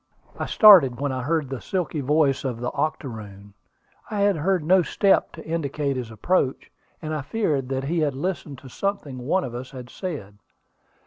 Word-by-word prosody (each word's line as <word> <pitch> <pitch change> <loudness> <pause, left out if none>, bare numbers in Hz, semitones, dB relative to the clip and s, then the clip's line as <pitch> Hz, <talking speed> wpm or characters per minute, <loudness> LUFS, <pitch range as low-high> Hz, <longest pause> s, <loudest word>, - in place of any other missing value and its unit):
I - - -2
started 170 - +7
when 140 -1 -1
I 130 -1 -3
heard 155 +2 0
the 135 -2 -5
silky 170 -5 -2
voice 145 0 +2
of 125 -4 -3
the 125 +1 -3
octoroon. 105 -9 -5 0.6
I 210 -2 -2
had 200 -1 +3
heard 180 +2 +1
no 185 +4 +5
step 195 +3 +2
to 160 - -10
indicate 150 -3 -2
his 125 -3 -4
approach, 130 - -1 0.3
and 155 0 -3
I 155 - -2
feared 145 - -1
that 135 0 -2
he 165 +5 -1
had 145 -4 0
listened 150 -2 -4
to 135 - -12
something 150 -3 -3
one 170 +10 0
of 120 - -6
us 125 +2 -6
had 125 -3 -10
said. 110 - -6
145 Hz, 185 wpm, -24 LUFS, 130-170 Hz, 0.6 s, started